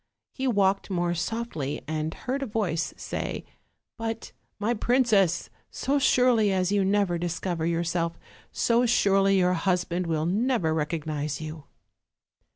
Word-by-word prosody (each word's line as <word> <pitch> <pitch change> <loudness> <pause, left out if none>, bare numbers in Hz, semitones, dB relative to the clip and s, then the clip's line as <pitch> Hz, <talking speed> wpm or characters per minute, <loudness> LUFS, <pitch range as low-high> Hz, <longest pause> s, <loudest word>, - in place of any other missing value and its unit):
He 265 0 -2
walked 200 -4 +2
more 175 -2 0
softly 165 - -3
and 155 0 -2
heard 265 +2 -3
a 275 - -2
voice 180 -8 -1
say: - - -4 0.5
"But, 225 0 -4 0.3
my 215 +3 0
princess, 215 -7 +2 0.2
so 285 +1 0
surely 245 -6 +4
as 185 0 +1
you 205 -1 +3
never 195 -3 +1
discover 175 -1 -2
yourself, 170 0 -1 0.3
so 240 +1 +2
surely 195 -4 +4
your 180 -1 +3
hus 180 +1 +1
band 175 0 -3
will 160 -1 0
never 200 -2 +1
recognize 150 -2 -2
you." 155 -1 -7
185 Hz, 135 wpm, -26 LUFS, 165-225 Hz, 0.5 s, surely